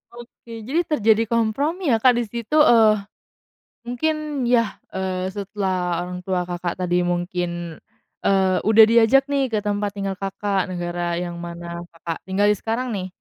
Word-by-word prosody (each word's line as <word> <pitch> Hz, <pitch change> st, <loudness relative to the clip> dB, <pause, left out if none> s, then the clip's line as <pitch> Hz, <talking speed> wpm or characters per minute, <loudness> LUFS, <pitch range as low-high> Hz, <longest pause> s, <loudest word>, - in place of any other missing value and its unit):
Oke, 235 Hz, -1 st, -11 dB
jadi 320 Hz, +6 st, +1 dB
terjadi 225 Hz, -6 st, +3 dB
kompromi, 275 Hz, -, 0 dB
ya, 225 Hz, -, +3 dB
Kak, 250 Hz, +1 st, +5 dB
di 240 Hz, -, 0 dB
situ. 235 Hz, +6 st, -5 dB
Eee, 235 Hz, -8 st, +6 dB, 1.0 s
mungkin, 300 Hz, +3 st, -2 dB
ya, 230 Hz, -4 st, +2 dB, 0.2 s
eee, 185 Hz, 0 st, -3 dB
setelah 190 Hz, -3 st, -2 dB
orang 180 Hz, 0 st, -6 dB
tua 185 Hz, -2 st, 0 dB
Kakak 175 Hz, -1 st, -4 dB
tadi 180 Hz, -1 st, 0 dB
mungkin, 175 Hz, -1 st, -3 dB, 0.5 s
eee, 190 Hz, -1 st, +3 dB
udah 220 Hz, 0 st, +8 dB
diajak, 250 Hz, +5 st, +4 dB
nih, 275 Hz, -1 st, +1 dB
ke 220 Hz, -3 st, -1 dB
tempat 205 Hz, -1 st, -2 dB
tinggal 195 Hz, -1 st, -4 dB
Kakak, 195 Hz, 0 st, -2 dB
negara 175 Hz, -1 st, -3 dB
yang 175 Hz, -1 st, -5 dB
mana 170 Hz, 0 st, -7 dB
Kakak 165 Hz, 0 st, -5 dB
tinggalin 205 Hz, +2 st, +2 dB
sekarang, 230 Hz, +3 st, -2 dB
nih, 195 Hz, -4 st, -3 dB
200 Hz, 150 wpm, -22 LUFS, 180-235 Hz, 1.0 s, udah